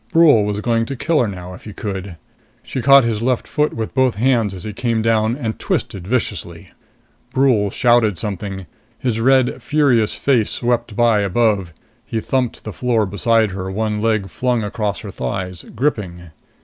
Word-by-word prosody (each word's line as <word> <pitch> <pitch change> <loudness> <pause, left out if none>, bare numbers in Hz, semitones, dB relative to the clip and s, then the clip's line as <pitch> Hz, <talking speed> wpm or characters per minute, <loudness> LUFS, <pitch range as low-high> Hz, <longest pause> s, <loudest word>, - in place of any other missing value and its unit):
Brule 155 -10 +6
was 105 0 -2
going 115 0 0
to 140 - -4
kill 160 +4 +1
her 120 - +2
now, 90 -2 -7
if 90 - -13
he 105 - -8
could. 95 -4 -5 0.5
She 130 - -4
caught 135 +2 +7
his 115 -2 -1
left 125 0 0
foot 150 0 0
with 110 -1 -4
both 130 -3 +2
hands 115 -2 +2
as 95 -2 -8
he 110 - -5
came 115 +1 -1
down, 110 +1 +2
and 115 -6 -4
twisted 95 -2 -3
viciously. 125 +1 -3 0.6
Brule 125 -7 +3
shouted 120 -4 +3
something. 95 -1 -5 0.3
His 120 -3 -1
red, 130 +1 +3
furious 125 -7 +2
face 125 -6 +2
swept 120 -2 -1
by 115 -2 +3
above. 100 -2 +1 0.3
He 115 - -3
thumped 125 +1 -1
to - - -17
the 110 - -6
floor 120 -4 +1
beside 110 +2 +1
her, 95 0 -5
one 105 +1 -2
leg 110 -3 +1
flung 125 +3 -1
across 105 -1 -3
her - - -7
thighs, 90 +7 -4
gripping. 95 - -2
110 Hz, 175 wpm, -19 LUFS, 100-125 Hz, 0.6 s, caught